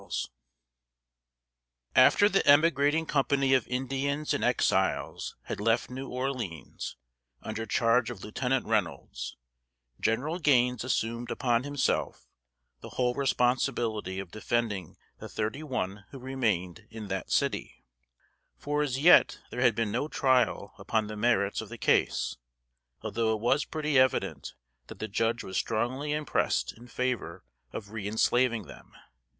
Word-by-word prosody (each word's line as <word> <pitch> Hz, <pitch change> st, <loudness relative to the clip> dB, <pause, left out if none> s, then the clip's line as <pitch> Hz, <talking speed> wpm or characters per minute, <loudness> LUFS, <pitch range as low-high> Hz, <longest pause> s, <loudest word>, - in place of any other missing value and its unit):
] -, -, -51 dB
After 205 Hz, -, +6 dB
the 195 Hz, -2 st, +2 dB
emigrating 145 Hz, +1 st, +4 dB
company 135 Hz, -2 st, +2 dB
of 130 Hz, -4 st, +2 dB
Indians 135 Hz, +3 st, -1 dB
and -, -, -1 dB
Exiles -, -, 0 dB
had -, -, -5 dB
left 115 Hz, +4 st, +1 dB
New 135 Hz, +1 st, -6 dB
Orleans, 125 Hz, -, -4 dB, 0.5 s
under 110 Hz, +1 st, -4 dB
charge 115 Hz, +3 st, +2 dB
of 110 Hz, -6 st, -8 dB
Lieutenant 125 Hz, +4 st, -1 dB
Reynolds, -, -, -2 dB, 0.6 s
Gen'l 145 Hz, +10 st, 0 dB
Gaines 125 Hz, -6 st, +3 dB
assumed 115 Hz, -1 st, -2 dB
upon 120 Hz, -2 st, +1 dB
himself 145 Hz, -1 st, -1 dB, 0.5 s
the -, -, -10 dB
whole 125 Hz, -1 st, +2 dB
responsibility 120 Hz, -6 st, 0 dB
of 95 Hz, -3 st, -6 dB
defending 110 Hz, -5 st, -2 dB, 0.2 s
the -, -, -8 dB
thirty 110 Hz, +7 st, -3 dB
one 105 Hz, -9 st, -4 dB
who 135 Hz, -, -10 dB
remained 115 Hz, -10 st, -2 dB
in 110 Hz, -2 st, -8 dB
that 95 Hz, -1 st, -3 dB
city; -, -, -1 dB, 0.7 s
for 145 Hz, +1 st, -1 dB
as 135 Hz, -4 st, -1 dB
yet 165 Hz, +6 st, +6 dB
there 125 Hz, -, -3 dB
had 120 Hz, -4 st, +4 dB
been 115 Hz, -2 st, -1 dB
no 125 Hz, +7 st, -1 dB
trial 125 Hz, -8 st, +1 dB
upon 110 Hz, +2 st, 0 dB
the 105 Hz, 0 st, -6 dB
merits 105 Hz, -3 st, +1 dB
of -, -, -9 dB
the -, -, -8 dB
case, -, -, +1 dB, 0.7 s
although 110 Hz, 0 st, 0 dB
it -, -, -5 dB
was 135 Hz, +7 st, +2 dB
pretty 150 Hz, -3 st, +1 dB
evident 130 Hz, -1 st, 0 dB, 0.3 s
that -, -, -10 dB
the 110 Hz, -, -4 dB
judge 115 Hz, +3 st, 0 dB
was 95 Hz, -, -4 dB
strongly 130 Hz, +6 st, -1 dB
impressed 150 Hz, -1 st, 0 dB
in 120 Hz, +2 st, -14 dB
favor 125 Hz, -9 st, -3 dB, 0.3 s
of 100 Hz, -, -7 dB
reënslaving 110 Hz, +2 st, +1 dB
them. -, -, -14 dB
120 Hz, 135 wpm, -29 LUFS, 105-135 Hz, 0.7 s, After